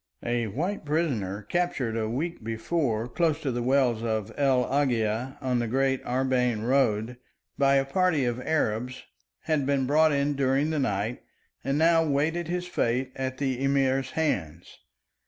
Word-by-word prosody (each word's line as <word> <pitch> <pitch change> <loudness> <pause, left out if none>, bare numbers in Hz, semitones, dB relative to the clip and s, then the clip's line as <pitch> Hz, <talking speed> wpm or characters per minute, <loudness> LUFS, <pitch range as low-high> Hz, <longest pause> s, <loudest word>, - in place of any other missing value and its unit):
A 120 -1 0
white 165 - -3
prisoner 130 - -1
captured 135 - -1
a 110 -1 -1
week 155 +5 -3
before 115 0 -1
close 160 +3 0
to 135 - 0
the 120 0 -2
wells 125 -3 +2
of 110 -1 -2
El 135 -3 +2
Agia 125 -2 0
on 125 -2 0
the 120 - -1
great 135 +2 0
Arbain 125 -3 0
road, 120 -2 +1 0.4
by 140 -1 +3
a 135 0 +3
party 160 -1 +1
of 120 +1 -2
Arabs, 125 -5 -1 0.4
had 155 -3 0
been 140 -2 +1
brought 155 +3 +4
in 140 0 +1
during 140 +2 +1
the 155 - 0
night 110 -2 -1 0.4
and 135 +2 0
now 165 +1 +4
waited 160 +3 0
his 180 +1 -2
fate 130 -6 -1
at 130 0 -3
the 135 -2 -2
Emir's 135 -1 +1
hands. 90 - -2
135 Hz, 155 wpm, -27 LUFS, 120-145 Hz, 0.4 s, brought